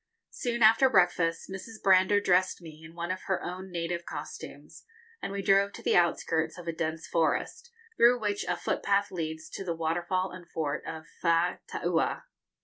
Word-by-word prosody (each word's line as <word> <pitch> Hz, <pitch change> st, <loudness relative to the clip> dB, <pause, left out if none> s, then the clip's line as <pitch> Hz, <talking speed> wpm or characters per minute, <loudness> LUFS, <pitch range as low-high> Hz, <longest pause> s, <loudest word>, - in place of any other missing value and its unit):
] 460 Hz, -, -55 dB
Soon 235 Hz, -1 st, -1 dB
after 225 Hz, +5 st, +6 dB
breakfast, 175 Hz, -5 st, +2 dB
Mrs. 215 Hz, +4 st, -8 dB
Brander 190 Hz, +1 st, +5 dB
dressed 185 Hz, -1 st, +2 dB
me 160 Hz, -2 st, -12 dB
in 165 Hz, +1 st, -12 dB
one 170 Hz, +1 st, -3 dB
of 185 Hz, -, -4 dB
her 190 Hz, -, 0 dB
own 185 Hz, +2 st, -6 dB
native 170 Hz, 0 st, -3 dB
costumes, -, -, -9 dB, 0.4 s
and -, -, -4 dB
we 200 Hz, 0 st, -3 dB
drove 200 Hz, +1 st, +3 dB
to -, -, -10 dB
the -, -, +2 dB
outskirts 165 Hz, -2 st, +1 dB
of 175 Hz, -1 st, -10 dB
a 165 Hz, -, -1 dB
dense 160 Hz, 0 st, -3 dB
forest, 170 Hz, -, -1 dB, 0.3 s
through 245 Hz, +1 st, +6 dB
which 205 Hz, -2 st, -1 dB
a 180 Hz, 0 st, -1 dB
footpath 200 Hz, +3 st, 0 dB
leads 160 Hz, -3 st, -4 dB
to -, -, -5 dB
the 170 Hz, -3 st, -2 dB
waterfall 175 Hz, +3 st, -1 dB
and 180 Hz, -2 st, -11 dB
fort 150 Hz, -2 st, -2 dB
of 160 Hz, -1 st, -6 dB, 0.2 s
Faataua. 170 Hz, +1 st, 0 dB
180 Hz, 175 wpm, -29 LUFS, 165-195 Hz, 0.4 s, after